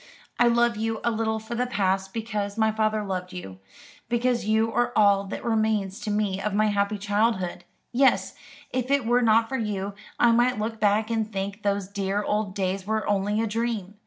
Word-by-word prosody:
"I 240 Hz, -, +6 dB
love 235 Hz, -1 st, +3 dB
you 225 Hz, 0 st, -2 dB
a 235 Hz, -, +2 dB
little 220 Hz, 0 st, -1 dB
for 220 Hz, +2 st, -7 dB
the 250 Hz, +1 st, 0 dB
past, 195 Hz, -4 st, 0 dB
because 210 Hz, -2 st, -3 dB
my 220 Hz, -1 st, +3 dB
father 215 Hz, 0 st, 0 dB
loved 185 Hz, -2 st, -4 dB
you 95 Hz, -, -8 dB, 0.5 s
because 240 Hz, 0 st, +1 dB
you 220 Hz, +1 st, +2 dB
are 240 Hz, 0 st, +1 dB
all 200 Hz, -2 st, +4 dB
that 195 Hz, -, -6 dB
remains 215 Hz, -4 st, 0 dB
to -, -, -5 dB
me 205 Hz, -2 st, 0 dB
of 205 Hz, 0 st, -2 dB
my 215 Hz, +1 st, +3 dB
happy 205 Hz, +1 st, 0 dB
childhood. 205 Hz, -2 st, 0 dB, 0.3 s
Yes, 265 Hz, +2 st, +3 dB, 0.4 s
if 255 Hz, 0 st, -2 dB
it 280 Hz, -3 st, +2 dB
were 240 Hz, +2 st, +3 dB
not 225 Hz, -1 st, +4 dB
for 265 Hz, -, -2 dB
you, 205 Hz, -3 st, -3 dB, 0.3 s
I 240 Hz, -, +5 dB
might 240 Hz, +1 st, +3 dB
look 220 Hz, +1 st, -3 dB
back 215 Hz, +2 st, +2 dB
and 220 Hz, -1 st, -1 dB
think 200 Hz, +1 st, -4 dB
those 200 Hz, -2 st, -1 dB
dear 200 Hz, 0 st, -2 dB
old 210 Hz, -2 st, -1 dB
days 190 Hz, 0 st, -2 dB
were 220 Hz, -1 st, -1 dB
only 205 Hz, +1 st, +1 dB
a -, -, +1 dB
dream. 225 Hz, -3 st, -2 dB
215 Hz, 195 wpm, -25 LUFS, 200-230 Hz, 0.5 s, I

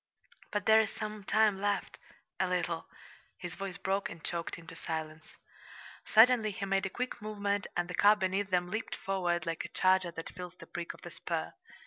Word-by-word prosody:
"But 205 Hz, -2 st, -1 dB
there's 220 Hz, 0 st, +6 dB
some 215 Hz, -1 st, -5 dB
time 210 Hz, -1 st, +3 dB
left 205 Hz, 0 st, -1 dB, 0.4 s
a 190 Hz, -, +2 dB
little!" 175 Hz, -2 st, -1 dB, 0.5 s
his 175 Hz, -1 st, -6 dB
voice 195 Hz, -1 st, -5 dB
broke 195 Hz, +1 st, 0 dB
and 165 Hz, -, -10 dB
choked 170 Hz, -1 st, -3 dB
into 165 Hz, -1 st, -11 dB
silence. 160 Hz, -1 st, -5 dB, 0.7 s
Suddenly 225 Hz, 0 st, +6 dB
he 195 Hz, -1 st, -4 dB
made 195 Hz, 0 st, +1 dB
a -, -, -6 dB
quick 250 Hz, +4 st, -4 dB
movement, 205 Hz, -1 st, -1 dB
and 175 Hz, 0 st, +1 dB
the 180 Hz, -, -6 dB
car 205 Hz, +4 st, +6 dB
beneath 195 Hz, 0 st, 0 dB
them 180 Hz, -1 st, +1 dB
leaped 220 Hz, +1 st, -2 dB
forward 175 Hz, -4 st, -1 dB
like 165 Hz, -1 st, -2 dB
a -, -, -5 dB
charger 185 Hz, -1 st, +3 dB
that 165 Hz, -1 st, -6 dB
feels 180 Hz, 0 st, -7 dB
the -, -, -12 dB
prick 175 Hz, -1 st, -5 dB
of -, -, -18 dB
the -, -, -7 dB
spur. -, -, -3 dB
190 Hz, 185 wpm, -32 LUFS, 175-205 Hz, 0.7 s, there's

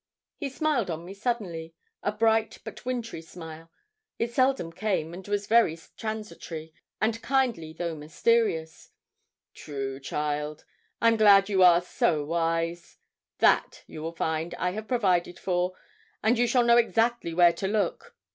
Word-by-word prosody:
He 285 Hz, -, -3 dB
smiled 270 Hz, -, 0 dB
on 165 Hz, 0 st, -4 dB
me 185 Hz, -, -8 dB
suddenly 195 Hz, -7 st, -3 dB, 0.3 s
a 205 Hz, -, 0 dB
bright 225 Hz, +1 st, +1 dB
but -, -, -9 dB
wintry 235 Hz, -8 st, -3 dB
smile 165 Hz, -1 st, -11 dB, 0.5 s
it 230 Hz, 0 st, -2 dB
seldom 255 Hz, -11 st, +1 dB
came, 185 Hz, -5 st, -1 dB
and 185 Hz, +2 st, -9 dB
was 205 Hz, 0 st, -1 dB
very 220 Hz, -7 st, +4 dB, 0.2 s
transitory, 210 Hz, -8 st, -6 dB, 0.3 s
and 225 Hz, +1 st, 0 dB
kindly 245 Hz, -13 st, 0 dB
though 170 Hz, +1 st, -4 dB
mysterious. 160 Hz, +1 st, 0 dB, 0.6 s
'True, 135 Hz, -2 st, -5 dB
child; 150 Hz, +2 st, -3 dB, 0.4 s
I'm 230 Hz, 0 st, +4 dB
glad 200 Hz, -2 st, +6 dB
you 195 Hz, -2 st, +2 dB
are 175 Hz, -1 st, +7 dB
so 155 Hz, -4 st, 0 dB
wise; 165 Hz, +1 st, -2 dB, 0.4 s
that, -, -, +2 dB
you 155 Hz, -, -9 dB
will 165 Hz, +1 st, -5 dB
find, 160 Hz, +1 st, -2 dB
I 180 Hz, -, -1 dB
have 215 Hz, +3 st, -6 dB
provided 185 Hz, -8 st, +1 dB
for, 180 Hz, 0 st, -1 dB, 0.5 s
and 225 Hz, +3 st, +4 dB
you 240 Hz, 0 st, +2 dB
shall 245 Hz, +1 st, +3 dB
know 235 Hz, 0 st, +5 dB
exactly 230 Hz, -6 st, +1 dB
where 175 Hz, -1 st, +6 dB
to 190 Hz, +3 st, -3 dB
look. 215 Hz, -, -2 dB
185 Hz, 145 wpm, -27 LUFS, 165-230 Hz, 0.6 s, are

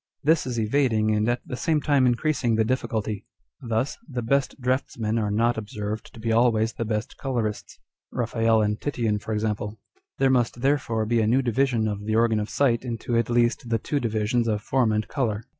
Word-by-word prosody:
This 155 Hz, -1 st, +3 dB
is 120 Hz, -2 st, -2 dB
evading 110 Hz, -2 st, +2 dB
and 105 Hz, +2 st, +1 dB
at 120 Hz, 0 st, 0 dB
the -, -, -4 dB
same 155 Hz, +4 st, +1 dB
time 140 Hz, -3 st, +3 dB
increasing 120 Hz, -1 st, +1 dB
the 110 Hz, -, +3 dB
difficulty. 110 Hz, -4 st, -2 dB, 0.3 s
Thus: 115 Hz, +3 st, -2 dB
The 125 Hz, -3 st, -3 dB
best 140 Hz, +4 st, 0 dB
draughtsmen 120 Hz, -3 st, -1 dB
are 105 Hz, -2 st, 0 dB
not 115 Hz, +2 st, +1 dB
observed 105 Hz, 0 st, -5 dB
to -, -, -11 dB
be 115 Hz, 0 st, -1 dB
always 115 Hz, -1 st, +3 dB
the 115 Hz, -, -3 dB
best 110 Hz, 0 st, -3 dB
colourists, 120 Hz, -6 st, -3 dB, 0.3 s
Eaphael 115 Hz, -2 st, +2 dB
and 105 Hz, 0 st, -2 dB
Titian 115 Hz, -7 st, -1 dB
for 110 Hz, -, -7 dB
example. 105 Hz, 0 st, -2 dB, 0.4 s
There 135 Hz, -1 st, +3 dB
must 120 Hz, -2 st, +1 dB
therefore 130 Hz, -5 st, +1 dB
be 115 Hz, +1 st, +2 dB
a 110 Hz, -, +1 dB
new 130 Hz, +4 st, +3 dB
division 120 Hz, -2 st, +1 dB
of 105 Hz, -1 st, -3 dB
the 110 Hz, 0 st, 0 dB
Organ 115 Hz, -1 st, +3 dB
of 105 Hz, -, -3 dB
Sight 125 Hz, -5 st, +1 dB
into 120 Hz, -1 st, -3 dB
(at 115 Hz, 0 st, +1 dB
least) 120 Hz, +1 st, +1 dB
the 115 Hz, -, +2 dB
two 145 Hz, +6 st, -2 dB
divisions 115 Hz, 0 st, 0 dB
of 105 Hz, -2 st, -1 dB
Form 125 Hz, -4 st, +2 dB
and 105 Hz, 0 st, 0 dB
Colour. 115 Hz, -6 st, -1 dB
115 Hz, 195 wpm, -25 LUFS, 110-125 Hz, 0.4 s, This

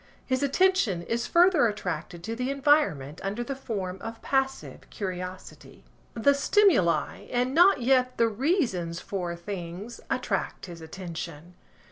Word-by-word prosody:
His 260 Hz, 0 st, 0 dB
attention 280 Hz, -, +2 dB
is 235 Hz, +5 st, -2 dB
further 340 Hz, -7 st, +5 dB
attracted 175 Hz, -5 st, -4 dB
to 225 Hz, +4 st, -4 dB
the 250 Hz, +2 st, -2 dB
environment 275 Hz, -, +2 dB
under 205 Hz, +5 st, -2 dB
the 275 Hz, +3 st, -4 dB
form 195 Hz, -8 st, -4 dB
of 225 Hz, 0 st, -7 dB
passive 270 Hz, -1 st, -2 dB
curiosity. 185 Hz, -2 st, -7 dB, 0.3 s
The 260 Hz, +5 st, +4 dB
stimuli, 280 Hz, -, +2 dB
and 250 Hz, +1 st, 0 dB
not 345 Hz, -3 st, +5 dB
yet 255 Hz, 0 st, +2 dB
the 230 Hz, -, +4 dB
reasons 220 Hz, -, 0 dB
for 180 Hz, -3 st, -4 dB
things, 185 Hz, +4 st, -7 dB
attract 240 Hz, -6 st, -2 dB
his 170 Hz, -3 st, -10 dB
attention. 170 Hz, -1 st, -7 dB
225 Hz, 130 wpm, -27 LUFS, 180-270 Hz, 0.3 s, further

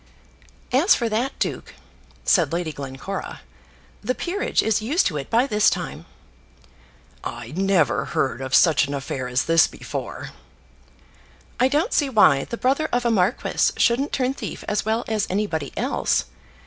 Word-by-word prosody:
"As 285 Hz, -, +5 dB
for 235 Hz, -2 st, -1 dB
that, 235 Hz, +6 st, -1 dB
duke," -, -, -3 dB, 0.5 s
said -, -, +3 dB
Lady 170 Hz, -1 st, -2 dB
Glencora, 140 Hz, +8 st, -6 dB, 0.6 s
"the 255 Hz, +4 st, -1 dB
peerage 380 Hz, +4 st, -1 dB
is 220 Hz, -1 st, +1 dB
used 290 Hz, -, +1 dB
to 150 Hz, -, 0 dB
it 135 Hz, -, -6 dB
by 235 Hz, +3 st, +3 dB
this 210 Hz, -6 st, +3 dB
time." 70 Hz, +5 st, -5 dB, 1.2 s
"I 120 Hz, -1 st, -6 dB
never 190 Hz, -5 st, +2 dB
heard 135 Hz, -1 st, -1 dB
of 130 Hz, 0 st, 0 dB
such 160 Hz, -4 st, +5 dB
an 140 Hz, -, -3 dB
affair 135 Hz, -2 st, -4 dB
as 125 Hz, +1 st, 0 dB
this 165 Hz, 0 st, +5 dB
before." -, -, -7 dB, 1.3 s
"I 255 Hz, -, +5 dB
don't 300 Hz, -, 0 dB
see 290 Hz, -3 st, +2 dB
why 155 Hz, -, +4 dB
the 235 Hz, -, -6 dB
brother 275 Hz, +6 st, +1 dB
of 245 Hz, 0 st, 0 dB
a 235 Hz, -, +3 dB
marquis 200 Hz, +2 st, +1 dB
shouldn't 265 Hz, +5 st, +2 dB
turn 260 Hz, 0 st, 0 dB
thief -, -, -7 dB
as 210 Hz, -1 st, 0 dB
well 220 Hz, +2 st, -1 dB
as 215 Hz, -2 st, -1 dB
anybody 180 Hz, -7 st, -2 dB
else. -, -, 0 dB
210 Hz, 155 wpm, -23 LUFS, -, 1.3 s, As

